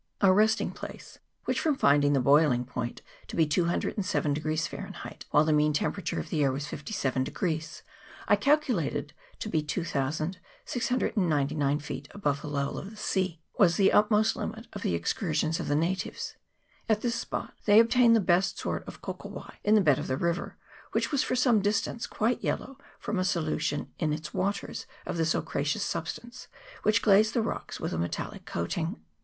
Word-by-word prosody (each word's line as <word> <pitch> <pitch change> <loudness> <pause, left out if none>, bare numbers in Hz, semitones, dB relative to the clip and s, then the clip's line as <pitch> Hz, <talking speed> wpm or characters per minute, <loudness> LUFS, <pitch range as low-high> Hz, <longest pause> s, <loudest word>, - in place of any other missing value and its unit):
Our 195 -2 +6
resting 220 +3 +3
place - - -10 0.3
which, - - 0
from 310 -3 +2
finding 145 - +4
the 140 - +3
boilin 140 -2 +4
point 120 -1 -5 0.2
to - - -7
be 165 - +4
207 170 0 0 0.3
Fahrenheit, 165 - -6
while 150 - +5
the 155 - +3
mean 150 0 +3
temperature 185 +6 -1
of - - -6
the 155 - +1
air 135 - +3
was 140 +2 -3
57, 135 - -2 1.0
I 205 - +6
calculated 245 - +1 0.2
to - - -5
be 160 -7 +1
2699 155 - -1
feet 145 -1 -6
above 145 -8 0
the 150 - -6
level 140 -1 -2
of 195 - -7
the 215 - -13
sea 185 -5 -1 0.2
was 175 -4 +5
the 195 -1 +5
utmost 210 +1 +4
limit 225 +1 -5
of - - -6
the 85 - 0
excur 160 - -1
sions 160 +1 +1
of - - -3
the 145 - +1
natives: 170 +5 -2 0.5
at 215 -1 +3
this 240 -1 0
spot - - -4
they 210 +1 +7
obtain 230 +1 +5
the 225 - +5
best 180 -1 +2
sort - - -3
of - - -10
kokowai - - -7
in 210 +1 +4
the 215 - +6
bed 145 -7 +4
of - - -4
the 130 - 0
river, 170 +3 -2 0.4
which - - 0
was 280 -3 +2
for - - 0
some 245 -4 +4
distance 210 +3 0
quite 230 +3 0
yellow 270 - -2 0.2
from 210 - -2
a - - +2
solution 155 -5 -1
in 155 -3 +1
its 155 0 -5
waters 200 +1 -2 0.2
of - - -3
this 165 0 +2
ochreous - - -1
substance, 240 +1 -5 0.3
which 210 -1 +2
glazed 215 +1 +5
the 230 - +2
rocks - - -4
with - - -3
a 80 - -1
metallic 85 +1 -4
coating. 160 - -2
175 Hz, 175 wpm, -28 LUFS, 150-215 Hz, 1.0 s, they